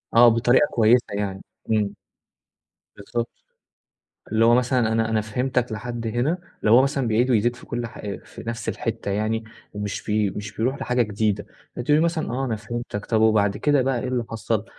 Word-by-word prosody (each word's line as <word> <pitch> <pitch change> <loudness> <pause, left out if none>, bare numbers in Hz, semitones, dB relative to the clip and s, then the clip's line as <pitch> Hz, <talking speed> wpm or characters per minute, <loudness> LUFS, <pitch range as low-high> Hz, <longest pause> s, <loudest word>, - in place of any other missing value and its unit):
آه 120 +1 +9
بطريقة 120 +5 +4
كويسة 120 +2 +4
يعني 100 -2 -3 0.3
إمم. 105 -2 +1 1.0
بالضبط، 115 +3 -3 1.0
اللي 110 +1 +4
هو 120 +1 +6
مثلًا 125 -2 +2
أنا 115 0 +1
أنا 110 -1 +2
فهمتك 125 +2 -1
لحد 120 +1 -5
هنا 120 +10 0 0.2
لو 105 - +3
هو 130 - +7
مثلًا 135 -1 0
بيعيد 120 +4 +2
ويزيد 120 +1 +2
في - - -14
كل 120 0 -3
حا 105 -2 -6
في - - -11
نفس 115 0 -4
الحتة - - -3
يعني، 110 +3 -1 0.3
ومش 105 +1 -4
ب 105 -2 +1
مش 105 +1 -6
بيروح 130 +5 -1
لحاجة 125 0 +1
جديدة 105 -1 -1 0.3
فتقولي 145 +5 +2
له - - +3
مثلًا 170 -1 -1
آه 130 +3 -1
أنا 115 -4 -1
فهمتك 110 -1 -5
طيب 110 -2 +1
وبعد 105 -2 +3
كده 145 -2 +2
بقى 130 -2 0
إيه 130 - -3
اللي 125 -2 -1
حصل، 115 -1 -1
115 Hz, 185 wpm, -23 LUFS, 110-125 Hz, 1.0 s, آه